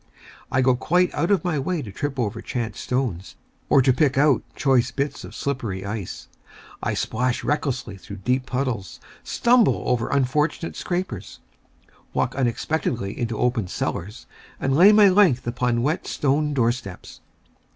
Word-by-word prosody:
I 130 Hz, -, +2 dB
go 130 Hz, -1 st, +4 dB
quite 180 Hz, +7 st, +1 dB
out 170 Hz, +4 st, 0 dB
of 200 Hz, -5 st, +2 dB
my 160 Hz, -5 st, 0 dB
way 160 Hz, +2 st, -2 dB
to 105 Hz, -, -8 dB
trip 135 Hz, +7 st, -4 dB
over 115 Hz, -5 st, -2 dB
chance 115 Hz, -5 st, -4 dB
stones, 125 Hz, -8 st, -2 dB, 0.3 s
or 135 Hz, -, +5 dB
to 130 Hz, -, +4 dB
pick 135 Hz, 0 st, +2 dB
out 140 Hz, -4 st, +4 dB
choice 130 Hz, -3 st, +2 dB
bits 140 Hz, +3 st, -3 dB
of -, -, -10 dB
slippery 110 Hz, -9 st, -3 dB
ice. 100 Hz, -2 st, -5 dB, 0.5 s
I -, -, -1 dB
splash 125 Hz, +2 st, -1 dB
recklessly 135 Hz, -8 st, -2 dB
through 100 Hz, +1 st, -9 dB
deep 130 Hz, +1 st, +1 dB
puddles, 125 Hz, -9 st, -3 dB, 0.2 s
stumble 240 Hz, -2 st, +3 dB
over 120 Hz, -2 st, 0 dB
unfortunate 150 Hz, +4 st, 0 dB
scrapers, 175 Hz, -, -4 dB, 0.7 s
walk -, -, 0 dB
unexpectedly 120 Hz, -4 st, -1 dB
into 115 Hz, -2 st, -3 dB
open 120 Hz, -5 st, 0 dB
cellars, 105 Hz, +4 st, -4 dB, 0.3 s
and 135 Hz, 0 st, 0 dB
lay 185 Hz, +7 st, +8 dB
my 210 Hz, -1 st, +7 dB
length 185 Hz, -10 st, +4 dB
upon 120 Hz, 0 st, 0 dB
wet 155 Hz, +6 st, -1 dB
stone 145 Hz, +1 st, 0 dB
doorsteps. 120 Hz, -6 st, -2 dB
130 Hz, 150 wpm, -23 LUFS, 115-150 Hz, 0.7 s, lay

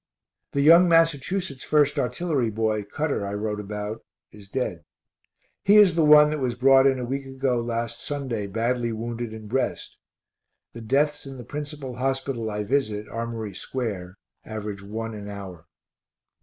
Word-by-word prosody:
The 140 Hz, -, +1 dB
young 170 Hz, +4 st, +7 dB
Massachusetts 165 Hz, -1 st, +1 dB
1st 150 Hz, -2 st, +2 dB
artillery 135 Hz, -2 st, 0 dB
boy, 110 Hz, -1 st, -1 dB
Cutter, 145 Hz, +2 st, -2 dB
I 100 Hz, 0 st, -3 dB
wrote 105 Hz, 0 st, -2 dB
about 105 Hz, +1 st, -5 dB, 0.3 s
is 100 Hz, -2 st, -14 dB
dead. 95 Hz, -, -3 dB, 0.8 s
He 205 Hz, -, +5 dB
is 200 Hz, -4 st, +7 dB
the 165 Hz, -1 st, +2 dB
one 150 Hz, 0 st, +7 dB
that 155 Hz, -, -2 dB
was 125 Hz, -3 st, -1 dB
brought 135 Hz, +2 st, +6 dB
in 135 Hz, -1 st, +2 dB
a 125 Hz, -, -3 dB
week 135 Hz, +2 st, -4 dB
ago 135 Hz, -2 st, 0 dB
last 115 Hz, 0 st, -3 dB
Sunday 130 Hz, -8 st, -3 dB
badly 115 Hz, +3 st, -1 dB
wounded 115 Hz, +1 st, -4 dB
in 110 Hz, -1 st, -9 dB
breast. 130 Hz, +5 st, -2 dB, 0.8 s
The 115 Hz, -, -8 dB
deaths 145 Hz, +5 st, 0 dB
in 135 Hz, -1 st, -8 dB
the 125 Hz, -, -8 dB
principal 145 Hz, -1 st, -6 dB
hospital 135 Hz, -3 st, -2 dB
I 105 Hz, 0 st, -3 dB
visit, 110 Hz, -3 st, -1 dB
Armory 115 Hz, -2 st, -4 dB
square, 100 Hz, -5 st, -5 dB, 0.3 s
average 105 Hz, -2 st, -6 dB
one 110 Hz, +3 st, -5 dB
an 105 Hz, -1 st, -7 dB
hour. 95 Hz, -5 st, -9 dB
120 Hz, 155 wpm, -25 LUFS, 110-140 Hz, 0.8 s, young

